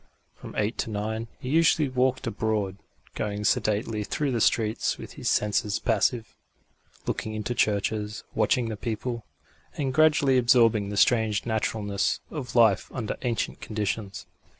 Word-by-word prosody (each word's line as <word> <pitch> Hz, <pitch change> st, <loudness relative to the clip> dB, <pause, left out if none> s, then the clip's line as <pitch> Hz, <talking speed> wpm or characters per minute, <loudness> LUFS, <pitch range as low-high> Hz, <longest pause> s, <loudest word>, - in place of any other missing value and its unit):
From -, -, -11 dB
eight 105 Hz, +3 st, -1 dB
to -, -, -1 dB
nine 110 Hz, +2 st, -3 dB
he 130 Hz, -, -6 dB
usually 155 Hz, 0 st, +4 dB
walked 130 Hz, 0 st, 0 dB
abroad, 105 Hz, -4 st, -1 dB, 0.4 s
going 105 Hz, -1 st, -3 dB
sedately 105 Hz, 0 st, +1 dB
through 140 Hz, +6 st, -1 dB
the 120 Hz, -3 st, 0 dB
streets 110 Hz, 0 st, +1 dB
with -, -, -9 dB
his -, -, -2 dB
senses 105 Hz, -1 st, +1 dB
passive, 115 Hz, +1 st, 0 dB, 0.7 s
looking 110 Hz, 0 st, -3 dB
into 110 Hz, +3 st, -2 dB
churches, 105 Hz, -1 st, 0 dB
watching 115 Hz, +2 st, +1 dB
the 110 Hz, -, -3 dB
people, 115 Hz, +1 st, -4 dB, 0.5 s
and 135 Hz, -3 st, -1 dB
gradually 145 Hz, -3 st, +4 dB
absorbing 115 Hz, -4 st, +4 dB
the 105 Hz, -, -4 dB
strange 110 Hz, -2 st, +3 dB
naturalness 105 Hz, -3 st, -1 dB
of 135 Hz, -7 st, -6 dB
life 110 Hz, -5 st, +4 dB
under 115 Hz, -5 st, -3 dB
ancient 120 Hz, -3 st, -2 dB
conditions. 105 Hz, -1 st, -3 dB
110 Hz, 140 wpm, -26 LUFS, 105-125 Hz, 0.7 s, usually